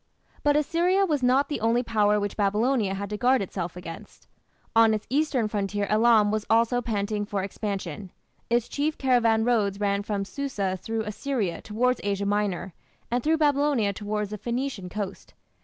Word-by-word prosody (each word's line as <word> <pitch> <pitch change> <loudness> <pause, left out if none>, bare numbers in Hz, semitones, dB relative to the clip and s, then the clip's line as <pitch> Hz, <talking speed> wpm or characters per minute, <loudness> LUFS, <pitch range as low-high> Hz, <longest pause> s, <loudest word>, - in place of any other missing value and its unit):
But 290 0 +3
Assyria 350 +6 +2
was 300 -6 0
not 255 +3 +3
the 290 - -3
only 230 +2 +2
power 210 -2 +2
which 205 -1 -3
Babylonia 210 +1 +1
had 200 +1 -5
to 210 - -2
guard 255 +3 +3
itself 180 -3 -4
against. 170 -2 -10 0.5
On 225 -1 +6
its 215 - -5
eastern 275 -5 +1
frontier 205 -1 -2
Elam 215 -1 +4
was 215 -1 -1
also 230 +2 +3
panting 210 -2 -2
for 205 -2 -3
expansion. 195 -3 -4 0.4
Its 235 0 +1
chief 300 +2 -1
caravan 235 -4 +3
roads 205 -5 +1
ran 200 -1 +1
from 200 -1 -2
Susa 205 -7 -3
through 225 +4 -3
Assyria 210 - -2
towards 250 +4 0
Asia 200 0 -1
Minor, 200 -3 -1 0.4
and 245 0 0
through 320 +1 +2
Babylonia 285 -8 +2
towards 210 0 -3
the 210 - -5
Phoenician 240 -5 -3
coast. 200 0 -6
215 Hz, 165 wpm, -26 LUFS, 200-250 Hz, 0.5 s, On